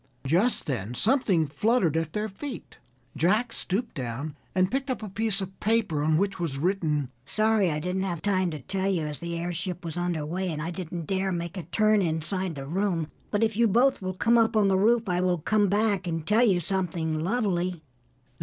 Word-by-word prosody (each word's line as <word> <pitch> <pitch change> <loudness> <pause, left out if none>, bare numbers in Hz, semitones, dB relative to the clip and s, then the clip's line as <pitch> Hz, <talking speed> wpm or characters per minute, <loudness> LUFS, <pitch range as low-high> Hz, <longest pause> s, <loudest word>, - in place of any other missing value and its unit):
Just 180 - +2
then 120 -4 -3
something 205 - +3
fluttered 170 - +1
at 160 -1 -1
their 210 +1 -1
feet. 245 +6 -8 0.4
Jack 215 +8 +2
stooped 220 +6 -2
down 130 +4 -4 0.2
and 185 0 +2
picked 270 +2 -1
up 255 -3 -2
a 210 - -5
piece 215 +1 0
of 190 0 -7
paper 210 -8 +1
on 155 +1 +3
which 195 +1 0
was 160 -6 -2
written: 150 -5 0 0.2
"Sorry 215 -2 +2
I 150 -1 -1
didn't 180 +4 -2
have 180 -4 -2
time 185 -2 +1
to 155 -3 -6
tell 195 +7 -1
you 175 -5 0
as 150 -1 -5
the 170 0 -4
airship 175 +1 -4
was 165 0 -4
under 175 -4 -1
way 180 +4 -2
and 155 -3 -3
I 165 +3 -3
didn't 175 -2 -5
dare 190 +2 0
make 170 0 -3
a 185 - -3
turn 215 +4 +3
inside 170 +1 -1
the 135 -1 -6
room, 170 0 -1 0.2
but 205 +1 +1
if 220 -2 +1
you 235 +1 +4
both 245 +5 +3
will 185 -1 -3
come 230 +4 +4
up 225 -1 +3
on 205 -2 +4
the 190 - +3
roof, 225 +3 +3
I 180 -1 +1
will 180 -1 +2
come 205 +6 +2
back 205 -2 +1
and 165 -2 -2
tell 215 +5 +3
you 190 -6 +3
something 170 -3 -1
lovely." 180 -3 -1
185 Hz, 210 wpm, -27 LUFS, 165-210 Hz, 0.4 s, you